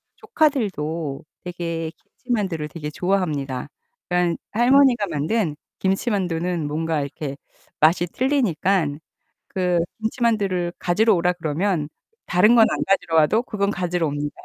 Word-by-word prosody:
조카들도 185 - -1 0.2
되게 170 -2 -4
김치만두를 195 -11 -3
되게 150 -2 -6
좋아합니다. 150 -8 -1 0.4
그러니깐 180 -1 +1
할머니가 245 -1 +4
만든 155 +2 -1 0.2
김치만두는 180 -5 0
뭔가 160 +1 -1
이렇게 140 0 -5 0.4
맛이 170 +3 +4
틀리니깐 190 - +1 0.5
그 180 -2 0 0.2
김치만두를 215 -6 0
가지러 215 +5 +3
오라 180 +1 +2
그러면 160 -1 -1 0.4
다른 210 +7 +4
건 225 -2 +7
안 - - -1
가지러 195 -4 +1
와도 160 +9 +4
그건 200 -4 -1
가지러 175 -3 -1
옵니다. 145 0 -3
180 Hz, 310 characters per minute, -22 LUFS, 160-210 Hz, 0.5 s, 건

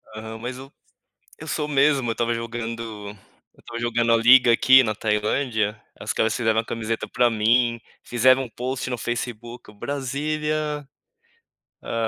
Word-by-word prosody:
Aham. 110 +1 -7
Mas 125 +2 -5
eu 135 +1 -11 0.7
eu - - -10
sou 150 - -2
mesmo. 140 -3 +2
Eu - - +1
estava 120 +1 -1
jogando 115 -2 -5 0.5
eu - - -33
estava 115 0 -8
jogando 120 0 +1
a 115 - +6
liga 125 +2 +6
aqui 130 +3 +6
na 110 -3 -1
Tailândia, 110 +1 -1 0.2
ah, - - -8
os - - -1
caras 110 -1 +1
fizeram 110 -2 +1
uma 115 - +1
camiseta 115 0 -3
pra 120 0 +2
mim, 115 +2 +2 0.2
fizeram 130 +2 +3
um - - -9
post 125 +3 -4
no 125 - -2
Facebook: 120 0 -5
"Brazilian". 150 +4 -3 1.0
Hã. 115 -1 -2
120 Hz, 160 wpm, -23 LUFS, 115-130 Hz, 1.0 s, a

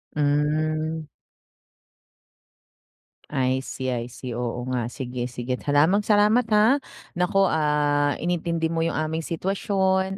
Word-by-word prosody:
Hmm. 155 +2 0 2.3
I 130 -2 0
see, 130 -1 -4
I 120 0 -4
see. 125 0 -7
Oo 120 +1 -3
nga, 120 -2 -1
sige, 125 0 -5
sige. 125 +1 -4
Maraming 150 +9 +2
salamat 210 +3 +3
ha, 220 +7 +4 0.3
naku, 180 +3 +2
ah, 150 -3 +1
inintindi 170 -1 -1
mo 165 - 0
'yung 165 -1 0
aming 155 +1 -1
sitwasyon 190 +2 0
155 Hz, 110 wpm, -24 LUFS, 130-185 Hz, 2.3 s, ha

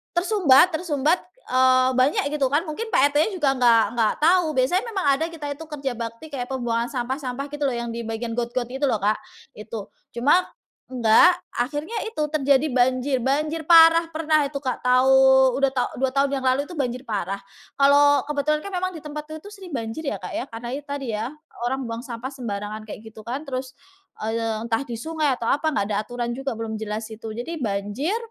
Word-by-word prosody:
tersumbat 355 -4 +5
tersumbat, 315 0 +1 0.3
eee, 255 0 +4
banyak 255 +3 +3
gitu 280 -3 +1
kan. 295 +4 +2
Mungkin 445 +10 -4
Pak 285 +2 +4
RT-nya 305 +7 +3
juga 285 -5 +2
enggak-enggak 230 -2 +3
tahu. 355 +2 +5
Biasanya 290 - +2
memang 385 -7 -2
ada 320 - -1
kita 295 -3 -6
itu 310 +3 -10
kerja 275 -3 -3
bakti, 230 +6 -6
kayak 250 -3 -3
pembuangan 240 -2 -1
sampah-sampah 260 +1 -3
gitu 295 0 -4
loh 260 - -1
yang 235 0 -4
di 235 - -4
bagian 225 +1 -4
got-got 240 +1 -1
gitu 270 +2 -1
loh, 220 - +1
Kak. 210 +2 +1 0.4
Itu. 210 -1 -7 0.3
Cuma 290 +10 +3 0.4
enggak, 255 +9 +5 0.2
akhirnya 295 - -2
itu 445 -9 -2
terjadi 285 -1 +2
banjir-banjir 265 +5 +1
parah. 330 0 +7
Pernah 310 -2 +2
itu, 285 - -5
Kak, 260 -3 -3
tau 255 +1 +4 0.4
udah 275 0 +2
tau 255 -2 0
2 265 - +2
tahun 275 -1 +1
yang - - -6
lalu 260 +2 +2
itu - - -9
banjir 255 -3 -2
parah. 200 -2 -2 0.4
Kalau 285 0 +5
kebetulan 300 +1 0
kan 400 - -6
memang 370 0 -1
di - - -10
tempatnya 300 +1 -7
tuh 410 - -11
sering 385 -4 -11
banjir 230 +5 -4
ya, 205 - -3
Kak, 180 - -6
ya. - - -2
Karena 230 +1 -6
itu 290 +1 -7
tadi 275 -5 -4
ya, 220 +3 -3 0.4
orang 265 +2 -2
buang 230 0 -5
sampah 240 0 -6
sembarangan 215 -4 -5
kayak 210 - -8
gitu 220 - -11
kan. 260 +5 -4
Terus, 255 -1 -4 0.5
eee, 225 0 -1
entah 230 +1 0
di 240 -4 -6
sungai 315 +1 0
atau 235 - -5
apa, 310 +3 +1
enggak 200 - 0
ada - - +1
aturan 240 +1 -4
juga, 270 +1 -3
belum 225 -1 -4
jelas 215 0 -4
itu. 220 0 -7
Jadi 245 +10 -5
banjir, 205 - -1
265 Hz, 195 wpm, -23 LUFS, 235-300 Hz, 0.5 s, parah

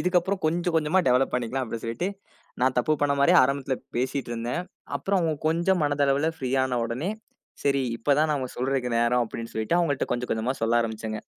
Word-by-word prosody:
இதுக்கு 180 -1 +3
அப்புறம் 190 +2 -3
கொஞ்சம் 170 +1 0
கொஞ்சமா 160 +4 +2
டெவலப் 125 +2 +3
பண்ணிக்கலாம். 125 +2 -1
அப்பிடின்னு 115 -1 -6
சொல்லிட்டு, 115 +11 -2 0.5
நான் 130 -1 +2
தப்பு 155 +5 +2
பண்ணமாரியே 140 +5 +4
ஆரம்பத்தில 135 -1 -1 0.2
பேசிட்டு 130 0 -2
இருந்தேன். 120 +9 -2 0.4
அப்புறம் 195 -1 0
அவுங்க 160 -2 0
கொஞ்சம் 170 +3 +2
மனதளவுல 145 +1 +2
ஃப்ரீ 130 -3 -3
ஆன 125 -2 -1
உடனே 130 - -3 0.5
சரி 140 -1 +2
இப்ப 140 +5 +2
தான் 155 0 +3
நான் 135 -4 -2
சொல்றக்கு 130 0 0
நேரம் 120 +1 +3
அப்பிடின்னு 115 0 -7
சொல்லிட்டு 110 +10 0
அவுங்கள்ட்ட 145 -6 +1
கொஞ்சம், 125 0 -3
கொஞ்சமா 115 +4 -1
சொல்ல 115 +1 +3
ஆரம்பிச்சேங்க. 110 -1 -4
135 Hz, 180 wpm, -26 LUFS, 120-160 Hz, 0.5 s, பண்ணமாரியே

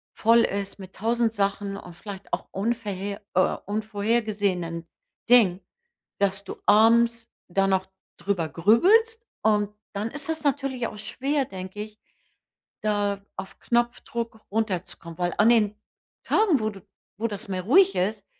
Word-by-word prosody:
voll 230 +1 +5
ist 200 -2 -1
mit 190 -1 -11
1.000 230 +1 0
Sachen 200 0 -1
und 180 -3 -10
vielleicht 200 +1 -10
auch - - -2
unverhe 205 -2 -3
äh, 185 - +3
unvorhergesehenen 205 -5 -1 0.4
Dingen, 205 -7 +6 0.6
dass 195 0 +1
du - - -7
abends 230 +2 +4 0.2
da 195 +2 +2
noch 190 -1 +1 0.3
drüber 175 -3 -1
grübelst. 425 - +4 0.2
Und 210 -1 +2 0.2
dann 210 +3 -2
ist 295 +3 -4
es 320 -1 -2
natürlich 275 -4 0
auch 215 - -8
schwer, 270 +6 -1
denke 190 +2 -7
ich, 215 0 -11 0.8
da 205 -1 0
auf 190 +1 -8
Knopfdruck 235 -1 -2
runterzukommen. 185 -6 -3
Weil 175 0 -1
an 210 - +6
den 215 -3 +4 0.5
Tagen, 385 - +3
wo 215 - 0
du 195 -3 -8 0.3
wo 220 +3 -1
das 210 0 -5
mehr 185 -1 -2
ruhig 370 - +5
ist, 200 +2 -1
210 Hz, 140 wpm, -25 LUFS, 195-235 Hz, 0.8 s, Dingen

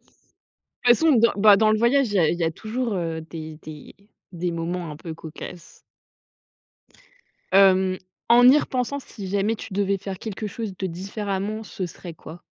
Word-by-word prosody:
De - - -39 0.6
toute - - -13
façon 325 -1 +4
dans 235 +1 +4
bah, 205 0 +7
dans 215 +1 +4
le 215 - +3
voyage, 250 +3 +3
il 205 - -5
y - - +3
a 165 - +4
il 170 - -1
y 170 - 0
a 160 - +1
toujours, 225 +6 -3
heu, 165 -3 -3
des 160 -1 -8
des 155 -2 -11 0.4
des 175 0 -3
moments 170 0 -3
un 150 - -8
peu 165 +1 -8
cocasses. 165 +1 -10 1.7
Hem, 190 -1 +5 0.3
en 245 +1 +8
y 275 - +7
repensant, 270 -1 -2
si 210 -7 -9
jamais 200 +3 0
tu - - -10
devais 200 0 +1
faire 195 -1 -6
quelque 215 -1 -5
chose 210 -2 -6
de 190 - -2
différemment, 200 +3 -4
ce 195 -3 -5
serait 175 0 -9
quoi? 165 +2 -12
195 Hz, 185 wpm, -24 LUFS, 170-220 Hz, 1.7 s, en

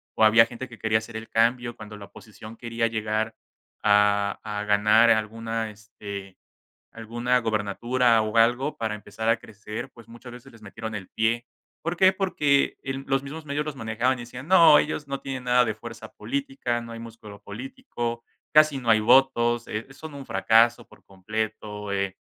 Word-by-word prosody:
o 110 - +4
había 115 +1 +7
gente 120 +2 -8
que 115 - -13
quería 110 -1 +1
hacer 110 0 -7
el 110 +1 -7
cambio, 120 +1 +1
cuando 105 0 -10
la 105 - -10
oposición 110 +2 -13
quería 115 -1 -1
llegar 110 0 -2 0.5
a 105 -1 +3
a 105 -1 -4
ganar 105 +3 +5
alguna, 115 +1 -1
este, 100 -2 -10 0.5
alguna 120 +2 -1
gubernatura 115 +2 +1
o 110 +1 -4
algo 120 +6 +3
para 110 -2 -2
empezar 110 +1 -4
a 115 - +4
crecer, 105 -2 -8
pues 115 -2 -16
muchas 120 +2 -12
veces 125 0 -13
les 115 -1 -17
metieron 110 +2 -7
el 95 -3 -7
pie. 115 +2 0 0.4
¿Por 170 +2 -2
qué? 185 +1 +5
Porque 150 -8 +1
los 135 0 -2
mismos 150 +3 -8
medios 145 +1 -2
los 155 -2 -5
manejaban 115 +2 -1
y - - -8
decían: 125 +4 -10
"No, 170 -4 +7
ellos 150 -1 -3
no 140 0 -4
tienen 135 -2 -5
nada 125 0 +4
de 110 -3 -2
fuerza 115 +1 -10
política, 270 - -3
no 115 0 -9
hay 115 - -8
músculo 110 -3 -11
político, 120 +1 -6 0.3
casi 155 -2 +6
no 125 -3 -3
hay 110 - +5
votos, 120 0 +3
eh, 105 +1 -5
son 160 +2 -10
un 140 -1 -8
fracaso 115 +1 +3
por - - -20
completo, 105 +1 -5
eh, 100 -1 -2
115 Hz, 180 wpm, -25 LUFS, 110-125 Hz, 0.5 s, había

